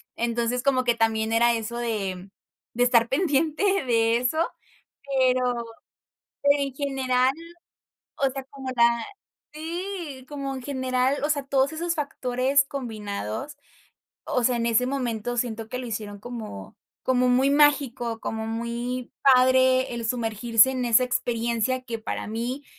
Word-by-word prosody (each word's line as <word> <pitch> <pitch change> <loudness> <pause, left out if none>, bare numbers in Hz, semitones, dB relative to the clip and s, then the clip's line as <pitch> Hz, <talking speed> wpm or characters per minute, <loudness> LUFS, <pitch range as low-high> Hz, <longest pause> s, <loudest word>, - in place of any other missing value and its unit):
entonces, 235 +1 -1
como 260 -2 +2
que 240 -1 +2
también 225 -1 +1
era 235 +1 +4
eso 230 +1 -3
de 195 -5 -3 0.4
de 245 +1 +2
estar 235 -2 +4
pendiente 310 +2 +1 0.2
de 230 -1 +3
eso, 250 +6 -1 0.8
pero 250 -2 +2 0.8
en 285 -1 +2
general, 265 -2 +1 0.9
o 275 - +2
sea 270 +1 -6
como 270 -2 -7
la 235 -1 +3 0.5
Sí, 330 -4 -5
como 275 -2 -4
en 260 - -6
general, 260 0 0
o 295 - +1
sea, 290 -2 0
todos 270 +1 +2
esos 335 +2 -2
factores 275 -1 +1
combinados, 215 - -5 0.7
o 250 - 0
sea, 245 +1 +3
en 230 - -1
ese 235 +2 +2
momento 245 -3 -2
siento 225 -2 -2
que 250 - -4
lo 255 - -5
hicieron 210 -2 -5
como 215 - -8 0.3
como 250 -1 +2
muy 260 +3 +3
mágico, 270 -6 +2
como 220 0 -4
muy 235 +2 -4 0.2
padre, 260 0 +4
el 235 -1 -4
sumergirse 230 +1 +3
en 255 -1 -2
esa 235 +1 +5
experiencia 240 0 -1
que 230 -2 -5
para 220 - -4
mí, 240 +6 -3
250 Hz, 140 wpm, -25 LUFS, 230-270 Hz, 0.9 s, esa